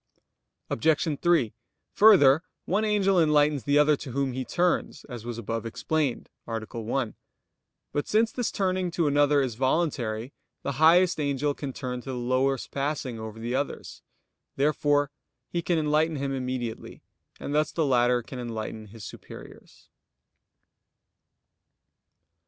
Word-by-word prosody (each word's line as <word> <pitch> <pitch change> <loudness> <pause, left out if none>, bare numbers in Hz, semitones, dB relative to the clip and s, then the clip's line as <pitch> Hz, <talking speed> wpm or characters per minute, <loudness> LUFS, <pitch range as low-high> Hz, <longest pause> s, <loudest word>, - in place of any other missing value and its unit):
Obj. 155 +3 +1
3: 170 -11 +3 0.4
Further, 160 -9 +7 0.2
one 205 +4 +1
angel 195 -4 +3
enlightens 150 -4 +3
the 145 +1 +3
other 150 0 +5
to 130 -4 -8
whom 135 -1 -1
he 130 +1 -3
turns, 175 +6 0
as 120 -4 -8
was 120 -1 -4
above 115 0 -3
explained 135 +4 -2 0.2
(A. 115 -1 -2
1). 115 +2 -3 0.8
But 145 - -2
since 220 +2 +2
this 245 -3 -2
turning 185 -2 0
to 170 -1 0
another 145 0 +3
is 130 -3 -2
voluntary, 130 -3 -1 0.3
the 140 -2 -3
highest 175 +2 +5
angel 145 0 0
can 140 -1 -5
turn 125 -1 -5
to 135 - -10
the 130 - -3
lowest 130 +2 0
passing 135 -4 -3
over 110 0 -7
the 120 +2 -3
others. 140 +2 -4 0.5
Therefore 145 0 +2 0.4
he 170 - -1
can 170 0 0
enlighten 155 +1 +1
him 140 -1 -2
immediately; 125 -3 -5 0.4
and 140 - -5
thus 150 +1 +1
the 160 - 0
latter 125 -2 +3
can 125 - -8
enlighten 110 -2 -5
his 110 +1 -12
superiors. - - -12
140 Hz, 140 wpm, -27 LUFS, 120-155 Hz, 0.8 s, Further